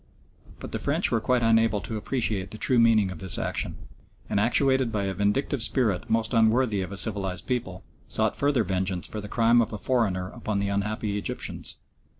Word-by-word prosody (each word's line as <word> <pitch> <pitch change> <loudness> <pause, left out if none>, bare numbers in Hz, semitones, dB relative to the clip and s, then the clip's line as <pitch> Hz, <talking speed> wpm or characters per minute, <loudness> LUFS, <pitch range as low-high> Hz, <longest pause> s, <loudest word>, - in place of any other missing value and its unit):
But - - -8
the - - -3
French - - +1
were 115 - +1
quite 125 +1 +1
unable 115 -1 +3
to 110 - -5
appreciate 105 -4 -1
the 110 - -9
true 125 +2 +2
meaning 110 -4 +4
of - - -8
this 95 -2 +1
action, - - -3 0.6
and, 100 - +2
actuated 130 +2 +2
by 105 -2 -1
a 95 -1 -2
vindictive 105 - 0
spirit 110 -4 +1
most 115 +1 0
unworthy 110 -2 +3
of 95 - -5
a 100 - -6
civilised 95 -3 -1
people, 115 -8 -3 0.2
sought - - 0
further 140 -4 +2
vengeance 95 -1 -2
for 105 - -4
the 105 - -8
crime 115 +1 +4
of 115 - -2
a - - -3
foreigner 100 -7 0
upon 110 -4 -3
the 100 0 -1
unhappy 105 +1 -2
Egyptians. - - -4
110 Hz, 190 wpm, -26 LUFS, 100-115 Hz, 0.6 s, meaning